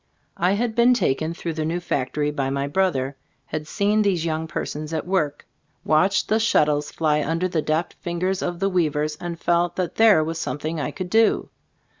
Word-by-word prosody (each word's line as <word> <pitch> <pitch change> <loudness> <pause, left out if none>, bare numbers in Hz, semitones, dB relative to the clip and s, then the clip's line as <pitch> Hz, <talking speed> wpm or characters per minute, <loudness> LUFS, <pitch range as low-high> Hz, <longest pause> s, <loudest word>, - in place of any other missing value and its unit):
I 180 +3 +2
had 225 +2 0
been 240 +2 +5
taken 155 - 0
through 170 -1 -4
the 155 0 -2
new 165 +3 -1
factory 145 -2 -1
by 135 -2 -2
my 140 0 -1
brother; 140 -5 0 0.3
had 155 0 -5
seen 205 +5 +1
these 185 -5 +1
young 160 0 -2
persons 155 0 -4
at 160 - -2
work; 155 -6 -1 0.4
watched 185 +5 +3
the 220 - +2
shuttles 150 -9 +2
fly 150 -2 +1
under 165 +4 0
the 170 -3 -1
deft 155 +3 -1
fingers 180 +2 -1
of 175 -1 -3
the 195 +1 +1
weavers, 155 -4 0
and 170 -1 -6
felt 175 0 +1
that 180 -2 -3
there 215 -8 +6
was 165 +1 -3
something 155 +2 -3
I - - -2
could 185 -2 -6
do. 225 -1 +3
165 Hz, 190 wpm, -23 LUFS, 150-185 Hz, 0.4 s, there